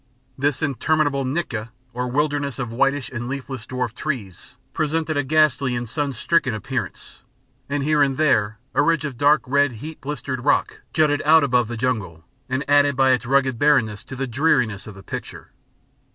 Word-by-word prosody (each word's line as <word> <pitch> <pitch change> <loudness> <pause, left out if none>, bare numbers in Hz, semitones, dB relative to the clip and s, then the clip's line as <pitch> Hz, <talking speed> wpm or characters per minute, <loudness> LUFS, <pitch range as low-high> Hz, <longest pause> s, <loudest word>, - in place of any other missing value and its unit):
This 140 +2 -1
interminable 145 0 +1
nyika, 130 -6 -3 0.2
or 125 +1 -2
wilderness 145 0 -1
of 125 -3 -4
whitish 135 +3 0
and 120 -1 -5
leafless 130 -3 -6
dwarf 125 -2 -3
trees, 120 - -5 0.2
presented 155 +1 -1
a 145 - +2
ghastly 140 -3 +2
and 120 0 -3
sun 145 +4 -2
stricken 130 0 +1
appearance; 105 - -5 0.5
and 140 0 -1
here 150 0 +2
and 135 -2 +2
there 110 -8 +2 0.2
a - - +3
ridge 155 0 +2
of 140 -4 -4
dark 145 +4 +3
red 140 0 +2
heat 150 +8 -9
blistered 135 -3 -4
rock 145 - +1
jutted 150 -2 +2
out 160 +1 +6
above 125 -4 +2
the 120 0 -5
jungle, 105 -10 -2 0.2
and 130 +2 -2
added 145 0 +4
by 135 0 +4
its 125 -2 0
rugged 130 -2 +2
barrenness 120 -9 +2
to 135 - -8
the 135 +1 -2
dreariness 120 -5 +1
of 105 - -9
the 100 - -12
picture. - - -8
135 Hz, 175 wpm, -22 LUFS, 120-145 Hz, 0.5 s, out